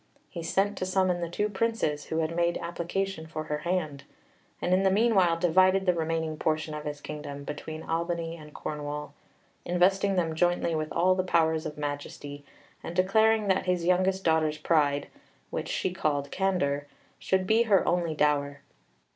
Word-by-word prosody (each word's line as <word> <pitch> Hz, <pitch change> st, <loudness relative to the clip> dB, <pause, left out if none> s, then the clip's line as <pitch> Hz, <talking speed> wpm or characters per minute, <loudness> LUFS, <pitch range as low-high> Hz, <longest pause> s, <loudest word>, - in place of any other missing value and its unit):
He 170 Hz, -, -5 dB
sent 195 Hz, +4 st, 0 dB
to 185 Hz, -, -1 dB
summon 185 Hz, -2 st, +1 dB
the 170 Hz, -, -2 dB
two 205 Hz, +5 st, 0 dB
Princes 205 Hz, -8 st, -1 dB
who 160 Hz, -, -3 dB
had 160 Hz, +1 st, -2 dB
made 170 Hz, 0 st, +1 dB
application 170 Hz, 0 st, -3 dB
for 155 Hz, -1 st, -5 dB
her 150 Hz, -1 st, -3 dB
hand, 155 Hz, -5 st, -2 dB, 0.6 s
and 180 Hz, -, 0 dB
in 185 Hz, -, +4 dB
the 195 Hz, -, +4 dB
meanwhile 190 Hz, -5 st, +3 dB
divided 185 Hz, +3 st, +4 dB
the 180 Hz, -, +4 dB
remaining 160 Hz, -1 st, -2 dB
portion 155 Hz, 0 st, -1 dB
of 150 Hz, 0 st, -6 dB
his 145 Hz, -1 st, -5 dB
kingdom 145 Hz, -2 st, -7 dB
between 155 Hz, +2 st, -6 dB
Albany 165 Hz, 0 st, -2 dB
and 155 Hz, -2 st, -12 dB
Cornwall, 150 Hz, -1 st, -5 dB, 0.5 s
investing 190 Hz, +3 st, +2 dB
them 165 Hz, -3 st, 0 dB
jointly 175 Hz, 0 st, +1 dB
with 155 Hz, -1 st, -2 dB
all 180 Hz, +2 st, +3 dB
the 185 Hz, 0 st, 0 dB
powers 160 Hz, -3 st, +1 dB
of 150 Hz, -, -8 dB
majesty, 145 Hz, 0 st, -5 dB, 0.4 s
and 170 Hz, -, -7 dB
declaring 215 Hz, +3 st, +3 dB
that 190 Hz, -1 st, +1 dB
his 180 Hz, -2 st, +1 dB
youngest 185 Hz, +1 st, +2 dB
daughter's 160 Hz, -2 st, +2 dB
pride, 145 Hz, -3 st, +1 dB, 0.4 s
which -, -, -3 dB
she 185 Hz, -, -1 dB
called 145 Hz, -6 st, -1 dB
candour, 145 Hz, -7 st, 0 dB, 0.3 s
should 190 Hz, 0 st, +1 dB
be 220 Hz, +4 st, +4 dB
her 195 Hz, -3 st, +4 dB
only 170 Hz, -2 st, +1 dB
dower. 145 Hz, -1 st, +1 dB
170 Hz, 170 wpm, -28 LUFS, 150-185 Hz, 0.6 s, in